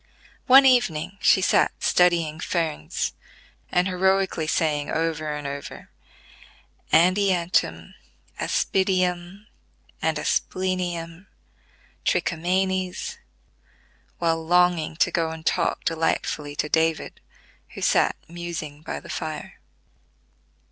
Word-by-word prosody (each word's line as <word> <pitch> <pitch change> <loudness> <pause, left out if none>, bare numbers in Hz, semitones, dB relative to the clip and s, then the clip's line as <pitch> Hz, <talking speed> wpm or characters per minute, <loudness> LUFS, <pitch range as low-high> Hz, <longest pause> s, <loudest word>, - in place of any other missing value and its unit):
One 270 +1 +8
evening 200 -8 +2
she 190 - +5
sat - - +3
studying 170 -3 +2
ferns, 160 - -2 0.6
and 180 +1 +2
heroically 190 -3 +1
saying 150 -2 0
over 160 -2 -1
and 150 -1 -5
over, 140 0 -7 1.0
"Andiantum, 175 - +2 0.5
Aspidium, 185 0 0 0.6
and - - 0
Asplenium, 180 -1 -2 0.8
Trichomanes," 185 - -1 1.0
while 165 -1 0
longing 175 -2 +2
to - - +2
go 165 -1 0
and 160 0 -8
talk 170 -2 0
delightfully 155 -2 -1
to 150 - -1
David, 160 +1 0 0.5
who - - -7
sat - - +3
musing 165 -3 -6
by - - -5
the - - -14
fire. 155 -2 -6
170 Hz, 95 wpm, -24 LUFS, 160-185 Hz, 1.0 s, One